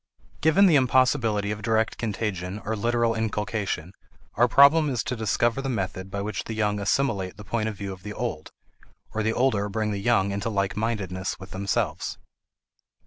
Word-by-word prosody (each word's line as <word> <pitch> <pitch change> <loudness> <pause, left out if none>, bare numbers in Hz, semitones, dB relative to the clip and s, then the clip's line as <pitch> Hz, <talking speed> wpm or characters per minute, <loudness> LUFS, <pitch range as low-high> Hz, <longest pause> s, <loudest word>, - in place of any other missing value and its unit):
Given 160 +6 +5
the 165 -6 +6
impossibility 125 -5 +2
of 105 0 -4
direct 110 +1 0
contagion 105 -4 -3
or 110 +2 -1
literal 115 +1 +1
inculcation, 105 -5 -2 0.4
our 120 +2 +4
problem 145 +5 +6
is 125 -5 -1
to 125 - -3
discover 115 +3 +1
the 135 - -3
method 95 -4 -3
by 100 +1 -3
which 105 +1 -4
the 110 - -5
young 105 -1 0
assimilate 100 -3 0
the 105 - -9
point 110 +1 -1
of 110 - -6
view 100 -1 -5
of 90 - -12
the 105 +2 -7
old, 110 -9 -4 0.6
or 110 - -1
the 110 +1 +1
older 110 -6 +1
bring 110 +1 -1
the 100 - -2
young 100 -3 +2
into 100 +3 -2
like 100 -2 -1
mindedness 100 -4 -2
with 95 0 -11
themselves. 100 +1 -2
110 Hz, 180 wpm, -25 LUFS, 100-120 Hz, 0.6 s, the